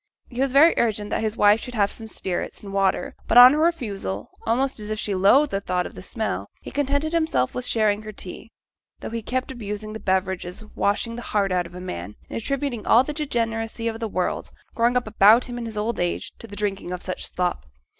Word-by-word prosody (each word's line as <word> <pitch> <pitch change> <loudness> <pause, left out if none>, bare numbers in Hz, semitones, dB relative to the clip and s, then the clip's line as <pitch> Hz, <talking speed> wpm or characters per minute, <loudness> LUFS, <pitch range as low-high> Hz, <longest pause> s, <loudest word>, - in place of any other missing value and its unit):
He 250 +1 -4
was 270 -1 +2
very 295 +5 +7
urgent 210 -3 0
that - - 0
his 220 0 -2
wife 210 +1 +5
should 250 -1 -7
have 200 -2 +2
some 225 - -7
spirits 190 -3 -4
and 200 -1 -8
water; 195 -1 +1
but - - +3
on 250 +2 +11
her 300 - +1
refusal, 210 - -1 0.2
almost 260 +3 +1
as 210 0 -6
if 215 - -2
she 205 - -1
loathed 230 +10 +4
the 195 - -1
thought 180 -2 -1
of - - -7
the - - -9
smell, 180 - -3
he - - -9
contented 285 +3 0
himself 315 - +1
with 250 - -3
sharing 215 -2 +2
her 215 0 -7
tea, 205 +2 -9 0.5
though - - -6
he 230 0 -3
kept 255 +4 -2
abusing 215 -3 -6
the 220 - -6
beverage 190 -1 0
as 180 +5 -8
'washing 215 +3 -1
the - - -5
heart 200 -4 0
out 180 -1 0
of 170 - -15
a - - -6
man,' 90 - -6 0.2
and - - -3
attributing 275 -3 -2
all 240 +3 +6
the 300 - -4
degeneracy 230 -6 -2
of 225 0 -3
the 225 - -2
world, 185 -3 -2 0.2
growing 240 +2 +2
up 250 - -1
about 215 +2 +6
him 245 -1 -5
in 235 - -4
his 220 -1 -7
old 220 +3 -1
age, 175 0 -1
to 230 - -9
the 205 - -9
drinking 200 -3 -3
of 180 0 -5
such 185 - -4
slop. 180 - -2
220 Hz, 235 wpm, -24 LUFS, 195-245 Hz, 0.5 s, on